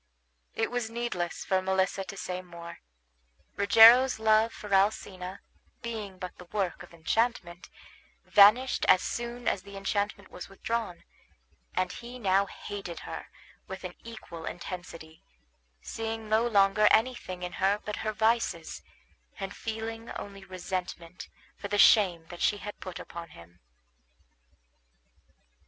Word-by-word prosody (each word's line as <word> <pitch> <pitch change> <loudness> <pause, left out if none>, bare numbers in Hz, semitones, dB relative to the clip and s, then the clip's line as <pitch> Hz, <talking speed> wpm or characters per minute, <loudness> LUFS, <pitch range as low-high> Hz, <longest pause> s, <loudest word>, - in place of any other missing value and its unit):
It 225 +1 -1
was 245 -2 -2
needless 230 -7 -3
for 190 -1 +2
Melissa 190 +1 0
to 195 - -8
say 180 -1 -4
more. 170 -1 -10 0.8
Rogero's 230 +6 +7
love 220 +1 +3
for 210 -2 -7
Alcina, 190 -2 0 0.4
being 215 -5 -5
but 180 -1 -7
the 180 - -10
work 190 0 -2
of - - -12
enchantment, 175 +1 -1 0.6
vanished 215 +6 +6
as 185 - +5
soon 240 +1 -4
as 185 - +1
the 200 +1 -11
enchantment 200 0 -2
was 180 - -9
withdrawn, 210 -2 -4 0.7
and 185 0 0
he 245 +1 -9
now 200 -3 +2
hated 195 -5 -7
her - - -7 0.4
with 190 0 -7
an 180 -1 -6
equal 215 -8 -9
intensity, 165 -3 -8 0.6
seeing 225 -1 -4
no 220 +2 +3
longer 205 -1 +4
anything 220 -6 +1
in 180 - -4
her 200 +2 +3
but 210 - -4
her 215 - -2
vices, 225 +2 0 0.6
and 195 -1 -5
feeling 225 +1 -5
only 200 -1 -8
resentment 180 -2 -6 0.3
for 200 - -6
the 205 - -1
shame 185 -5 +5
that 175 - -9
she 205 - +2
had 205 0 -8
put 185 -2 -7
upon 170 0 -8
him. 85 +1 -16
200 Hz, 135 wpm, -29 LUFS, 180-225 Hz, 0.8 s, Rogero's